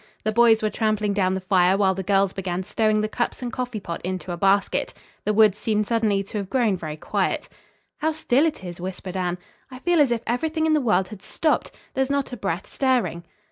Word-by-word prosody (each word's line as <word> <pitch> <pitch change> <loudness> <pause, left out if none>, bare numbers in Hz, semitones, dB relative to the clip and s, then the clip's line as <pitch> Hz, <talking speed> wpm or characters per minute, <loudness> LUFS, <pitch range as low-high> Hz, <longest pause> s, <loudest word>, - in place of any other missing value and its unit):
The 215 - +1
boys 225 -1 +5
were 215 - +1
trampling 215 -1 0
down 190 -2 +1
the 190 - -3
fire 185 0 +3
while 195 -2 +3
the 190 - -4
girls 195 0 +2
began 185 -1 -3
stowing 215 +2 +1
the 215 - 0
cups 240 +3 -3
and 240 -2 -4
coffee 245 -3 -3
pot 170 -4 -6
into 185 -1 -4
a - - -2
basket. 195 +3 +1 0.3
The 210 - +2
woods 210 -2 +5
seemed 215 -1 0
suddenly 215 -3 +1
to 210 +2 -5
have 195 -2 -5
grown 235 -5 +2
very 155 -4 -6
quiet. - - -1 0.5
"How 315 +1 +1
still 310 -1 +2
it 305 -11 -4
is," 175 -1 -7
whispered 185 0 -6
Anne. 180 -1 -1 0.3
"I 255 - -9
feel 340 +4 +2
as 280 - +4
if 235 -2 0
everything 315 +7 0
in 315 - +3
the 305 - +3
world 190 -6 +2
had 210 -3 -10
stopped. 315 - 0 0.2
There 265 - 0
is 265 - 0
not 280 -2 -1
a - - -2
breath 185 -4 -3
stirring." 240 - 0
210 Hz, 225 wpm, -24 LUFS, 190-245 Hz, 0.5 s, boys